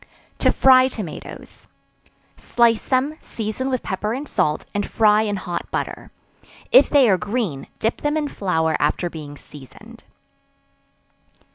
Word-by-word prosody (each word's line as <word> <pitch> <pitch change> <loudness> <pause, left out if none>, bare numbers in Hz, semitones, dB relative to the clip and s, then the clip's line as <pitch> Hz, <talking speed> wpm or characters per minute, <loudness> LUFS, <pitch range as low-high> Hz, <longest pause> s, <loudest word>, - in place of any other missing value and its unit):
To - - +3
Fry 260 -1 +5
Tomatoes. 210 -10 -9 0.7
Slice 235 -2 +1
them, 280 +4 0
season 225 +4 -4
with 255 -2 -2
pepper 210 +3 -3
and 285 +3 -6
salt, 150 - -1
and 205 - -1
fry 215 0 +3
in 210 -2 -1
hot 180 -2 -5
butter; - - -4 0.6
if - - +7
they 280 -4 +5
are 190 -4 +3
green, 205 - -3
dip 225 - -2
them 295 +1 0
in 300 -1 -1
flour 160 - -1
after 165 +4 0
being 145 -2 -9
seasoned. 140 -3 -15
215 Hz, 135 wpm, -21 LUFS, 175-255 Hz, 0.7 s, if